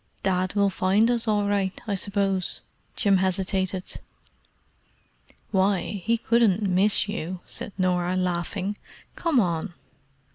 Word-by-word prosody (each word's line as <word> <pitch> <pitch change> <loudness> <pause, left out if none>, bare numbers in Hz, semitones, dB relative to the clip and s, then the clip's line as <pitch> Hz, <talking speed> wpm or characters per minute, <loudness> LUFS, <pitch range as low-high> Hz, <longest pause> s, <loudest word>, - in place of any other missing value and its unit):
"Dad 185 0 0
will 200 -1 +3
find 200 +6 +2
us 235 -1 0
all 205 -1 +1
right, 200 -2 0
I 210 - -2
suppose?" 195 -1 -1 0.3
Jim 200 -3 +3
hesitated. 190 0 -1 1.5
"Why, 195 0 +1
he 230 +3 +2
couldn't 220 -3 +2
miss 195 +3 +4
you!" 185 -3 -4
said - - -6
Norah, 180 -1 +1
laughing. 185 +3 -2 0.4
"Come 325 -7 +1
on." 175 -2 -1
195 Hz, 115 wpm, -25 LUFS, 185-205 Hz, 1.5 s, miss